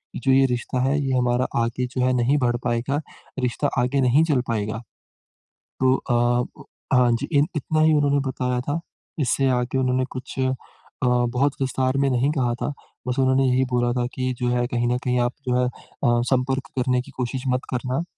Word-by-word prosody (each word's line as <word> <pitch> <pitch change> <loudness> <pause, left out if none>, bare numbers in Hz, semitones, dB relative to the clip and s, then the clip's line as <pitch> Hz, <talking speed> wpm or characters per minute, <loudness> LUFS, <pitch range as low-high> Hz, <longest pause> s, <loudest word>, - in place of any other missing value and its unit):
जो 135 - +1
ये 135 0 +5
रिश्ता 125 0 -2
है 135 - +2
ये 135 - 0
हमारा 125 0 +2 0.2
आगे 120 +2 -1
जो 130 -1 -2
है 130 - +3
नहीं 125 +4 +2
बढ़ 120 -1 +1
पाएगा, 120 +4 0 0.4
रिश्ता 125 +3 0
आगे 125 +3 +1
नहीं 130 +5 +4
चल 145 -6 +2
पाएगा। 110 -1 -2 1.0
तो 130 0 +5
अ, 120 -1 0 0.3
हाँ, 125 -1 +4
जी, 115 - -1 0.3
इतना 155 +2 0
ही 155 0 +5
उन्होंने 145 -1 +3
बताया 125 -1 -1
था। 145 +5 -2 0.4
इससे 135 -1 +2
आगे 125 +1 0
उन्होंने 130 0 +1
कुछ 130 +1 -7
अ, 130 0 +2 0.5
बहुत 125 +3 +2
विस्तार 130 0 0
में 140 0 +2
नहीं 130 +3 +2
कहा 125 -5 0
था। 145 - -1 0.3
बस 125 +1 -1
उन्होंने 130 0 +3
यही 130 +1 +3
बोला 120 0 +2
था 125 -1 0
की 130 -1 -1
जो 125 - +1
है 120 0 +1
कहीं 120 0 -1
न 125 - +1
कहीं 125 -1 +1
आप 120 +1 +1 0.2
जो 125 - +2
है 125 - +2
अ, 120 -1 -1
संपर्क 130 +1 0
करने 125 0 +1
की 140 - -13
कोशिश 125 +1 -3
मत 130 0 +1
करना। 125 +5 -1
125 Hz, 190 wpm, -23 LUFS, 120-135 Hz, 1.0 s, ये